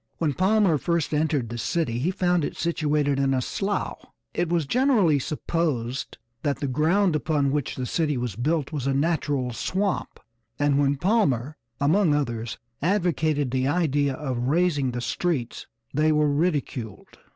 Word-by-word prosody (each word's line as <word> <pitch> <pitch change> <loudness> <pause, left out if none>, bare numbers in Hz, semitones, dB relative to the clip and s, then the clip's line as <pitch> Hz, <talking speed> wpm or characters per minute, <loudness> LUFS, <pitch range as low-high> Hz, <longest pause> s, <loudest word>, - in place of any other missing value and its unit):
When 155 -4 0
Palmer 190 -2 +3
first 170 -2 -1
entered 150 -6 0
the 120 0 -5
city 120 -3 -1
he 150 +8 0
found 180 -3 +1
it - - -4
situated 150 -4 0
in 135 -1 +2
a - - +1
slough. 195 - -2 0.3
It 175 -1 -1
was 170 -3 +1
generally 215 - +3
supposed 140 -4 -2 0.2
that 145 -2 0
the 140 - -3
ground 160 +7 +2
upon 150 -3 +1
which 145 -2 -2
the 130 - -3
city 150 0 0
was 120 -5 -3
built 150 +5 -1
was 140 -4 -3
a 135 - +1
natural 140 -4 0
swamp, 195 - -2 0.4
and 145 -1 +2
when 140 0 +2
Palmer, 150 - +1 0.2
among 155 +2 +3
others, 120 -5 -2 0.2
advocated 160 -6 +1
the 130 0 +1
idea 145 -3 +1
of 130 -5 -3
raising 150 -3 +2
the 120 0 -4
streets 135 -2 -2 0.3
they 155 +2 +3
were 150 -1 +3
ridiculed. 140 - -2
150 Hz, 155 wpm, -25 LUFS, 135-170 Hz, 0.4 s, Palmer